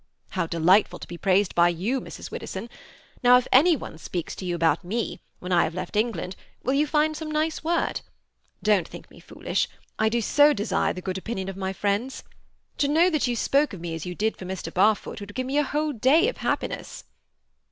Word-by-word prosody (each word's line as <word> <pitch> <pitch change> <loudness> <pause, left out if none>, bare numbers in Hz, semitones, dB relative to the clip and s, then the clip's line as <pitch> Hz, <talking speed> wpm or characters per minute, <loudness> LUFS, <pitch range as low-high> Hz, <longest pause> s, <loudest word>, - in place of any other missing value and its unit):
"How 185 -4 -1
delightful 175 +5 +3
to - - -10
be 170 0 -8
praised 195 0 +2
by 175 0 +5
you, 205 +10 -1
Mrs. - - -9
Widdowson! 235 - -6 0.5
Now 250 0 +7
if 250 - -1
any 325 +6 +6
one 190 - -8
speaks 175 -1 -5
to 185 - -6
you 175 -1 -1
about 165 -2 +2
me, 220 +6 -3 0.2
when 180 - -7
I 175 -1 +5
have 160 +1 -3
left 185 - -5
England, 210 -4 -1 0.3
will 260 - +1
you 295 +2 +2
find 305 +1 +2
some 310 0 -5
nice 310 +1 -1
word? 340 +2 0 0.6
Don't 205 -6 +3
think - - -12
me - - -15
foolish. - - -2 0.3
I 220 - +3
do 235 +2 0
so 290 +6 +5
desire 210 -1 0
the 185 - -8
good 190 0 -3
opinion 190 -2 -4
of 195 - -6
my 190 0 -3
friends. 205 +6 -2 0.6
To 285 - +3
know 330 +5 +4
that 305 -5 +1
you 245 - 0
spoke 280 +4 +2
of 190 - -7
me 170 -1 -5
as 165 -1 -5
you 180 - -5
did 220 +3 -1
for 185 - -8
Mr. 185 0 -5
Barfoot 205 +4 +2
would 205 0 -9
give 255 - -2
me 275 +3 +1
a - - +3
whole 300 +2 -1
day 280 - +4
of - - -7
happiness." - - -3
215 Hz, 215 wpm, -25 LUFS, 185-280 Hz, 0.6 s, Now